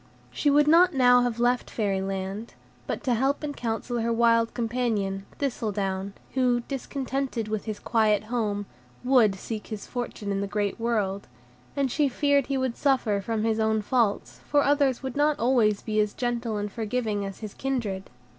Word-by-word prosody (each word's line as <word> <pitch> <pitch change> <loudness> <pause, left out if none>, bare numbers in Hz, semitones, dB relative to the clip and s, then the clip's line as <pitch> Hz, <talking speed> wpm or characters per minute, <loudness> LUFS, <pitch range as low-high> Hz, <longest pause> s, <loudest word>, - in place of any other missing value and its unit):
She 295 - +1
would 290 +1 +4
not 335 +1 +6
now 245 -1 +6
have 240 -1 -1
left 245 +1 +1
Fairy 200 -4 -1
Land, 195 +3 -4 0.3
but - - -3
to 255 -4 +1
help 270 +6 +1
and 290 -1 -3
counsel 235 +1 -2
her 230 +1 0
wild 230 0 +3
companion, 225 -5 -1
Thistledown, 200 -7 -2 0.2
who, 250 -2 +2
discontented 270 -2 -3
with 215 -1 -3
his 215 -2 -4
quiet 215 -3 +2
home, 215 -3 -2 0.4
WOULD 245 -6 +4
seek 215 +2 -6
his 215 -2 -6
fortune 240 -4 -4
in 195 0 -1
the 200 - -2
great 205 +1 -2
world, 210 -4 -1 0.5
and 275 -3 0
she 290 0 +2
feared 285 +1 +2
he 275 - 0
would 260 -2 -1
suffer 245 -8 +1
from 220 +2 -2
his 225 0 +1
own 220 -1 +1
faults 225 -3 0
for 290 -1 +3
others 280 -3 +2
would 265 -2 -4
not 295 +1 +2
always 230 -4 +2
be 215 -1 -1
as 210 -1 +1
gentle 240 -3 -2
and 205 0 -3
forgiving 220 -2 -2
as 195 +2 -7
his 215 -2 -6
kindred. 225 -8 -3
230 Hz, 175 wpm, -26 LUFS, 210-260 Hz, 0.5 s, not